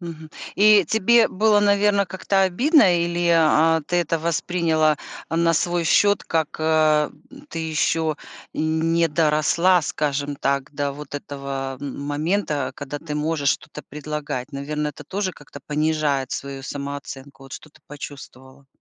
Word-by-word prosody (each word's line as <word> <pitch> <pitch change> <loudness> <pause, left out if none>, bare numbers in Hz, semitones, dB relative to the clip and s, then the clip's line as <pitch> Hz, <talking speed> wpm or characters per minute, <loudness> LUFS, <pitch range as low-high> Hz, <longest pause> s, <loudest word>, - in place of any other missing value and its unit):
Мгм. 160 -3 -9 0.2
И 210 -2 +6
тебе 225 +4 +4
было, 210 +2 +3
наверно, 200 -1 +3
как-то 190 +2 0
обидно, 190 - +4
или, 170 0 -1
а, 160 0 +4
ты 175 - 0
это 165 -1 +1
восприняла, 160 -2 +1 0.3
а, 165 - -2
на 165 0 +3
свой 175 +1 0
счет, 205 +4 +3
как: 160 -2 -1
э, 155 -1 +3 0.4
"Ты 165 - -5
еще 160 -1 0 0.4
не 165 +1 +1
доросла", 160 +3 +2
скажем 145 -1 -2
так, 140 0 -1
до 140 -1 -2
вот 145 0 -7
этого 135 -2 -6
момента, 145 +1 -2
когда 145 0 -6
ты 150 -2 -5
можешь 150 -2 0
что-то 150 - -5
предлагать? 150 -3 -5
Наверно, 150 +2 -3
это - - -9
тоже 195 -1 -3
как-то 145 -2 -13
понижает 150 -3 0
свою 135 -1 -5
самооценку. 140 -1 -7
Вот 135 - -13
что-то 155 - -12
почувствовала? 135 -2 -11
155 Hz, 135 wpm, -22 LUFS, 145-170 Hz, 0.4 s, И